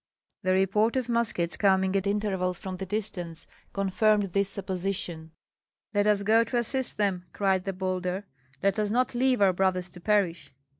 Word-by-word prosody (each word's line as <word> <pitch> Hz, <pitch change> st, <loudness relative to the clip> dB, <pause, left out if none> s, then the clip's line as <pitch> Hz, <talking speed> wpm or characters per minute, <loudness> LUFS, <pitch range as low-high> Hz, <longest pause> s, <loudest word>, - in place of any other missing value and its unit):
The 185 Hz, 0 st, +1 dB
report 205 Hz, +5 st, +2 dB
of 255 Hz, -2 st, -1 dB
muskets 225 Hz, -8 st, 0 dB
coming 190 Hz, -1 st, +3 dB
at 195 Hz, 0 st, +1 dB
intervals 195 Hz, -3 st, 0 dB
from 185 Hz, 0 st, -6 dB
the 190 Hz, +1 st, -5 dB
distance 185 Hz, -5 st, -4 dB, 0.3 s
confirmed 200 Hz, 0 st, +1 dB
this 200 Hz, -1 st, +2 dB
supposition. 185 Hz, -4 st, -3 dB, 0.6 s
"Let 205 Hz, 0 st, +2 dB
us 205 Hz, -1 st, +3 dB
go 220 Hz, +3 st, +5 dB
to 240 Hz, +2 st, -2 dB
assist 255 Hz, +2 st, -1 dB
them!" 195 Hz, -4 st, 0 dB
cried 190 Hz, -2 st, +1 dB
the 195 Hz, -, -2 dB
bolder; 185 Hz, +1 st, -2 dB, 0.4 s
"let 200 Hz, +2 st, +2 dB
us 210 Hz, -1 st, +1 dB
not 250 Hz, +4 st, +1 dB
leave 250 Hz, -2 st, +2 dB
our 190 Hz, -2 st, +5 dB
brothers 185 Hz, -1 st, 0 dB
to 175 Hz, -, -11 dB
perish!" 185 Hz, -8 st, 0 dB
195 Hz, 165 wpm, -27 LUFS, 185-210 Hz, 0.6 s, go